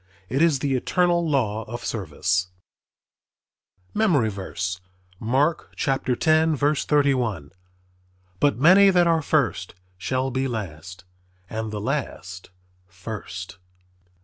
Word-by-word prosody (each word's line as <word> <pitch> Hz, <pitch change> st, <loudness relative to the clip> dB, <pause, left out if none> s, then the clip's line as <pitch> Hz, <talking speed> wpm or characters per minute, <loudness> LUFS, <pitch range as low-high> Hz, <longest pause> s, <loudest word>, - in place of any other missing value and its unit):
It 135 Hz, +5 st, 0 dB
is 165 Hz, -4 st, +4 dB
the 135 Hz, 0 st, -1 dB
eternal 170 Hz, +5 st, +1 dB
law 110 Hz, -7 st, 0 dB
of 120 Hz, +2 st, -7 dB
service. 90 Hz, -2 st, -1 dB, 1.5 s
MEMORY 160 Hz, -, +2 dB
VERSE, 95 Hz, -1 st, -4 dB, 0.4 s
Mark 145 Hz, +8 st, 0 dB
10: 155 Hz, +4 st, +2 dB
31 135 Hz, -, +1 dB, 0.4 s
"... 90 Hz, 0 st, -37 dB
But 145 Hz, -4 st, +2 dB
many 185 Hz, +8 st, +7 dB
that 180 Hz, -2 st, +4 dB
are 165 Hz, -1 st, +3 dB
first 135 Hz, -, 0 dB, 0.2 s
shall 130 Hz, +5 st, -1 dB
be 130 Hz, +2 st, -1 dB
last; 90 Hz, -5 st, -6 dB, 0.5 s
and 110 Hz, 0 st, -3 dB
the 105 Hz, 0 st, -4 dB
last 105 Hz, -7 st, -4 dB, 0.4 s
first." 95 Hz, 0 st, -8 dB
125 Hz, 105 wpm, -24 LUFS, 95-150 Hz, 1.5 s, many